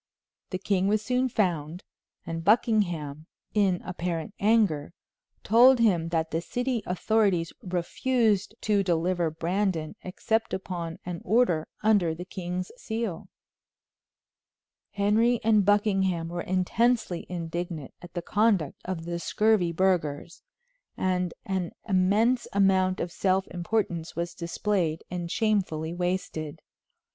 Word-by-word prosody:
The 185 - -2
king 190 0 0
was 215 +1 +1
soon 255 +2 +1
found, 175 -6 -1 0.4
and 165 0 -4
Buckingham, 175 -8 +1 0.3
in 195 -4 +2
apparent 175 0 -4
anger, 200 -9 +2 0.5
told 245 +5 +6
him 180 -8 +2
that 165 -1 -1
the 165 - -1
city 245 +4 -2
authorities 185 -2 +1
refused 205 +4 0
to 210 -2 +2
deliver 175 -1 +1
Brandon 170 0 -1
except 220 +4 -1
upon 175 -3 -5
an 175 -1 -5
order 185 -7 +2 0.2
under 200 -7 +3
the 175 +2 -7
king's 180 -1 -5
seal. 220 -8 -4 1.7
Henry 220 +4 +3
and 215 -2 +4
Buckingham 195 -5 +2
were 175 0 -3
intensely 185 +2 0
indignant 170 -3 -5
at 175 0 -12
the 175 - -3
conduct 205 -7 +1
of 180 -3 -4
the 170 0 -3
scurvy 210 -2 +2
burghers, 170 -3 0 0.6
and 180 -1 0
an 190 -3 -2
immense 210 +6 +2
amount 190 -1 +3
of 170 - -3
self 190 +1 +1
importance 175 -2 -2
was 170 0 -3
displayed 170 -1 -1
and 175 -1 -4
shamefully 180 -7 0
wasted. 175 -4 -3
185 Hz, 115 wpm, -27 LUFS, 170-210 Hz, 1.7 s, told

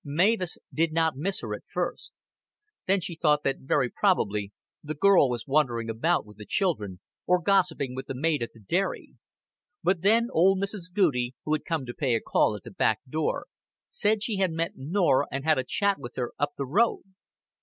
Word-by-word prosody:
Mavis 180 +5 +1 0.2
did 165 +1 +1
not 160 -2 +1
miss 190 +8 -2
her - - -4
at - - -8
first. - - -4 0.8
Then 195 0 +3
she 170 - -3
thought 150 -2 +2
that 135 - 0
very 135 -1 +1
probably 105 - +1 0.3
the 155 +1 -5
girl 185 -3 +5
was 120 -2 -3
wandering 125 -6 +1
about 160 +9 +1
with 105 -1 -16
the 105 - -10
children, 105 - -1 0.3
or 180 0 +4
gossiping 175 -8 +1
with 130 +1 -6
the 135 - -4
maid 150 +2 0
at 115 - -2
the 115 - -18
dairy; 175 - -2 0.7
but 180 0 +1
then 225 +5 +3
old 190 +4 +4
Mrs. 195 -3 -2
Goudie, 135 -11 +1
who 155 - 0
had 155 - -1
come 165 -5 -2
to 120 - -6
pay 130 -4 0
a - - +1
call - - +1
at - - -9
the - - -10
back - - +1
door, 155 +4 -2 0.5
said 215 0 +1
she 220 -3 -1
had 190 -1 +2
met 165 +1 -2
Norah 150 0 +1
and 135 0 -3
had 155 -2 +3
a - - 0
chat 200 +8 0
with 120 - -9
her 125 -2 -3
"up 145 +1 0
th' 140 - -3
road." 205 - +2
155 Hz, 200 wpm, -27 LUFS, 130-190 Hz, 0.8 s, girl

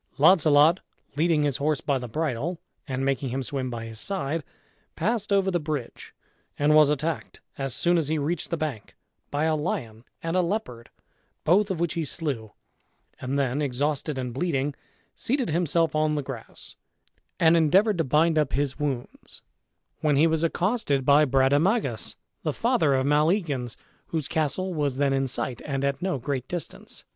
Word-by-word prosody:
Launcelot, 155 +1 +6 0.4
leading 155 0 +2
his 145 -3 +1
horse 150 0 0
by 140 -2 0
the 125 - -6
bridle, 155 +5 -2 0.3
and 135 -1 -2
making 135 -1 0
him 130 +2 -2
swim 130 0 -3
by 115 -2 -5
his 110 -1 -7
side, 160 -3 -2 0.5
passed 215 -2 -1
over 195 -1 +3
the 175 - +1
bridge, 150 -5 -5 0.5
and 145 +1 +3
was 155 -1 +7
attacked 150 +2 -2 0.2
as 135 -2 -2
soon 175 +2 +3
as 155 - -1
he 155 +1 0
reached 155 +3 -2
the 170 - -1
bank 145 -9 -5 0.3
by 145 +1 -1
a 160 0 +2
lion 120 -8 -3 0.2
and 165 +1 -1
a 185 - +4
leopard, 170 - -3 0.5
both 200 +5 +3
of 185 -4 -2
which 170 -1 0
he 165 - -1
slew, 135 - -3 0.7
and 130 +2 -2
then, 140 +1 0
exhausted 145 +2 -1
and 125 -2 -3
bleeding, 140 -1 -1 0.4
seated 255 - -1
himself 165 -1 +2
on 155 0 +1
the 145 - -1
grass, 130 -4 -7 0.6
and 165 0 +5
endeavored 180 +5 +4
to - - +3
bind 155 +3 +3
up 150 -3 0
his 140 +1 -1
wounds, 135 -5 -5 0.6
when 150 -2 +2
he 150 +4 +5
was 160 0 +1
accosted 170 - 0
by 145 +2 +6
Brademagus, 135 - +2 0.3
the - - -1
father 145 -4 +2
of 130 0 +1
Maleagans, 150 - +1 0.3
whose 155 -4 -2
castle 165 +3 -1
was 145 -5 -1
then 140 -1 +2
in 135 0 +1
sight, 125 -1 -2
and 140 -1 -2
at 140 -1 -1
no 185 -5 0
great 130 0 -3
distance. 175 -2 -6
150 Hz, 170 wpm, -26 LUFS, 135-165 Hz, 0.7 s, was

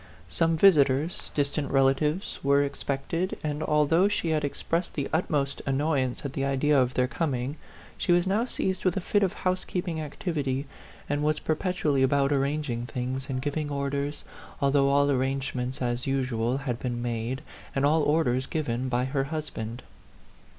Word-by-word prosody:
Some 165 - +2
visitors 155 -3 +4
distant 145 0 0
relatives 140 +6 +1
were 140 +1 +4
ex 140 0 -4
pected, 165 +7 -2
and 150 0 -2
although 155 +4 +3
she 205 -5 -1
had 155 -1 +1
expressed 165 +4 -2
the 140 -2 -1
utmost 145 -4 0
annoyance 135 -2 0
at 140 - -4
the 135 - -2
idea 140 +2 +2
of 125 0 0
their 125 0 +2
com 145 0 -1
ing, 130 +5 -3 0.4
she - - +1
was 175 +1 +4
now 200 +4 +2
seized 190 -6 -2
with 185 0 +1
a - - +2
fit 205 +3 +1
of 190 -3 +1
house 185 0 -1
keeping 175 -3 -3
activity, 145 -3 -2 0.4
and 145 +1 -1
was 155 0 +2
perpetually 155 -4 0
about 140 +1 +3
arranging 140 -4 -1
things 130 +2 -4
and 130 -1 -2
giving 145 +1 -2
orders, 140 +1 -2 0.4
although 140 0 +3
all 140 +1 +3
arrangements, 130 -1 -1
as 120 +2 -1
usual, 130 -2 0
had 130 -4 -3
been 120 -2 -3
made, 120 +2 -3 0.3
and 135 +1 +2
all 155 +2 +4
orders 135 -4 +2
given, 130 -5 -2
by 125 0 +1
her 135 0 -1
husband. 135 -6 -5
140 Hz, 165 wpm, -27 LUFS, 130-155 Hz, 0.4 s, visitors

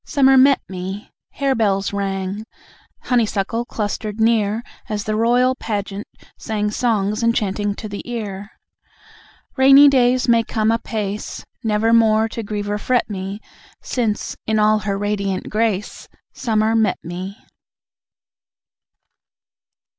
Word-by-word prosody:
Summer 270 -2 +4
met 270 +1 +6
me! 190 +2 -6 0.2
Harebells 220 -8 0
rang, 195 +1 -3 0.6
Honeysuckle 230 -1 0
clustered 210 -1 -4
near, 220 -1 +2 0.3
As 210 -1 -2
the 215 -2 -2
royal 245 +3 +3
pageant 205 -4 -4 0.3
sang 210 -1 -2
Songs 215 -2 0
enchanting 205 -3 0
to 215 - -7
the 205 -1 -6
ear. 205 -4 -5 1.1
Rainy 275 +2 +8
days 255 -1 +3
may 230 -1 +5
come 220 0 0
apace, 210 -3 -3 0.2
Nevermore 220 0 +3
to 230 - -5
grieve 205 -1 -4
or 205 0 -2
fret 250 -1 0
me, 195 +1 -5 0.4
Since, 225 -5 -2
in 220 0 +1
all 215 0 +4
her 200 -2 -2
radiant 200 -2 -2
grace, 215 -2 -1 0.3
Summer 220 -1 +1
met 220 -4 +2
me! 185 +4 -6
215 Hz, 115 wpm, -20 LUFS, 205-230 Hz, 1.1 s, Rainy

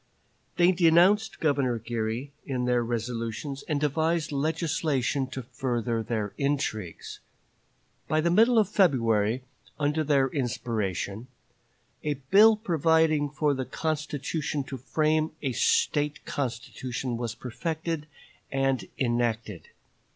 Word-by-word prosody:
They 175 +1 +6
denounced 185 +5 +4
Governor 140 -6 +1
Geary 115 +4 -3
in 130 -3 -2
their 125 -1 +2
resolutions, 115 +3 -3
and 150 -3 0
devised 160 +2 0
legislation 145 -3 0
to 130 0 -6
further 120 -2 -2
their 110 -3 -3
intrigues. 135 - -2 0.9
By 155 - +1
the 170 +2 +2
middle 230 +6 +5
of 215 -3 +5
February, 120 - +2 0.4
under 150 +2 +1
their 140 -3 +3
inspiration, 110 - -2 0.8
a 150 -1 0
bill 200 +12 +6
providing 160 -5 +2
for 150 +1 +1
a 130 -2 -1
convention 150 0 -2
to 135 0 -7
frame 155 +4 0
a 135 - 0
State 150 +4 +1
constitution 125 -1 -4
was 115 -1 -4
perfected 160 +4 -4 0.4
and 135 -1 0
enacted. 120 -6 -1
140 Hz, 110 wpm, -27 LUFS, 120-155 Hz, 0.9 s, They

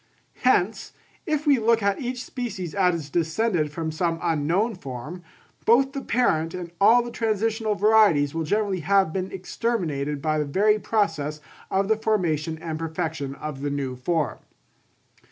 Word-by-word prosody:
Hence, 220 -4 +1 0.3
if 305 -1 0
we 280 -4 +4
look 230 -1 +2
at 200 +3 +1
each 250 0 -3
species 205 -10 -5
as 175 -7 +1
descended 165 0 0
from 160 +1 -3
some 165 +1 -1
unknown 170 +7 +1
form, 150 - -7 0.4
both 270 +4 +4
the 275 - -3
parent 165 -12 +1
and 175 -2 -6
all 235 +4 +6
the 240 - -7
transitional 220 -1 0
varieties 200 -9 +4
will 165 - -2
generally 200 +2 0
have 190 0 +2
been 190 0 -3
exterminated 175 -8 -2
by 155 +2 0
the 150 - 0
very 210 +9 +2
process 160 -10 -1 0.3
of 195 +1 +1
the 220 0 +2
formation 165 -8 0
and 160 -1 -5
perfection 160 -4 -3
of 150 -2 -6
the 145 - -1
new 140 -2 -3
form. 150 +3 -1
180 Hz, 155 wpm, -24 LUFS, 155-220 Hz, 0.4 s, all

